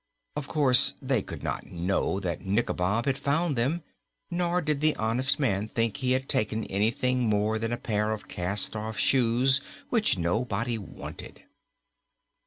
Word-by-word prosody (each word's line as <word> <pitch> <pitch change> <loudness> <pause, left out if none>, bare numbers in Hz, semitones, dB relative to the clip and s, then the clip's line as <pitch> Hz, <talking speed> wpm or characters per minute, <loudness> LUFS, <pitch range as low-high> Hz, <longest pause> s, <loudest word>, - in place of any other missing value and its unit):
Of 145 -2 -4
course, 135 -5 +3
they 130 -5 +1
could - - -8
not - - -3
know 90 +2 -1
that 85 -3 -3
Nikobob 100 +1 0
had 135 -1 0
found 150 +2 +1
them, 140 +8 0 0.5
nor 175 0 +1
did 150 -4 -1
the 155 0 +3
honest 120 +4 +1
man 105 -7 +1
think 115 +1 -1
he 130 -2 +1
had 130 +1 -1
taken 110 +1 0
anything 115 +5 +1
more 105 +1 +1
than 115 +1 -2
a 120 - -1
pair 105 -2 -1
of 110 -1 -5
cast 95 +4 +1
off 110 0 -4
shoes 130 +4 +3 0.3
which 220 - +2
nobody 110 +6 -1
wanted. 100 - -9
115 Hz, 155 wpm, -28 LUFS, 105-135 Hz, 0.5 s, course